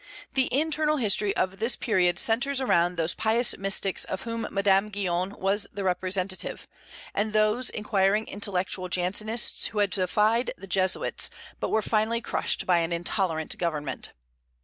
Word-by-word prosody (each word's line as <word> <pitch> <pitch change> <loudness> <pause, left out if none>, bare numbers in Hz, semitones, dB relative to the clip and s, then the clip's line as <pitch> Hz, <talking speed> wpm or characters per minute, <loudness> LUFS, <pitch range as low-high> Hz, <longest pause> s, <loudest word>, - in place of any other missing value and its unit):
The 265 -1 +1
internal 305 +2 +1
history 210 -4 +1
of 185 +1 -1
this 230 +3 +3
period 180 -7 +1
centres 260 +7 +2
around 175 -9 +2
those 165 +1 0
pious 225 +2 +2
mystics 195 0 +1
of 190 0 -4
whom 230 0 -4
Madame 195 +1 +2
Guyon 185 -3 -1
was 200 +2 +1
the 200 - -5
representative, 185 0 -2 0.5
and 210 +1 -1
those 215 +3 +2
inquiring 210 0 +1
intellectual 185 -2 -2
Jansenists 205 +6 +1
who 220 - -8
had 205 -2 +2
defied 210 +6 +1
the 195 - -10
Jesuits, 190 0 0 0.3
but - - -2
were 220 - +1
finally 220 +2 +1
crushed - - -1
by 175 -2 +3
an 165 0 -1
intolerant 170 -2 -1
government. 150 -5 -2
200 Hz, 150 wpm, -26 LUFS, 185-220 Hz, 0.5 s, this